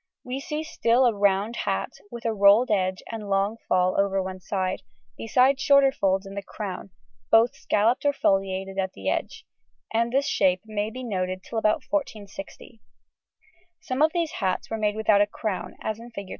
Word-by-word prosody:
We 255 +2 -4
still 300 +2 -4
see 315 -6 -4
a 245 +1 +5
round 200 +2 +1
hat 195 -2 -2 0.2
with 235 0 -9
a 225 - +1
rolled 210 +4 +5
edge 185 -2 0
and 215 -3 -6
long 200 +3 +1
fall 185 +1 +2
over 195 -1 0
one 185 0 -4
side, 185 0 -2 0.3
besides 260 - +2
shorter 280 -1 +5
folds 195 -5 0
in 195 - -9
the 200 - -4
crown, 195 -1 -6 0.4
both 225 +2 +5
scalloped 230 +6 +1
or 290 - +3
foliated 195 -5 0
at 190 -1 -1
the 95 - -3
edge, - - -4 0.5
and 230 +1 +1
this 275 +2 +1
shape 185 -2 +2
may 215 -1 -2
be 255 +3 -8
noted 185 -4 -3
till 225 - -3
about 215 -1 +1
1460. 215 -7 -5 1.0
Some 255 +2 -3
of 310 - +6
these 335 -2 -1
hats 190 0 -2
were 225 - -1
made 210 -1 0
without 215 -2 +3
a 205 - +3
crown, 205 -2 -4
as 220 0 -3
in 235 +1 -10
Fig. 200 -5 -8
210 Hz, 185 wpm, -25 LUFS, 195-235 Hz, 1.0 s, of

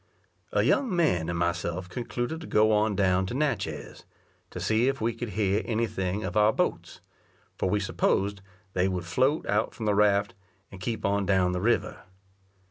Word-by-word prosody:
A - - +2
young 245 -9 +2
man 90 - +1
and 85 - -2
myself 85 +1 -1
concluded 120 - -4
to 165 - -8
go 110 +1 +3
on 105 0 +2
down 95 -1 +2
to 120 - -4
Natchez, 105 - -2 0.5
to - - -7
see 110 +3 +2
if 135 0 0
we 115 +1 0
could 115 0 -5
hear 100 0 +2
any 115 0 0
thing 95 -1 -3
of 90 -1 -4
our 105 0 +5
boats; - - -2 0.5
for - - -1
we 105 - +1
supposed 100 0 0 0.3
they 90 +1 +2
would 90 -2 -3
float 130 - +1
out 105 +2 0
from 110 - -5
the 105 - +2
raft, 100 0 +3 0.4
and 95 - -11
keep 115 +3 -3
on 100 -1 +1
down 95 -2 +3
the 90 0 -2
river. 115 +4 0
105 Hz, 185 wpm, -27 LUFS, 95-115 Hz, 0.5 s, our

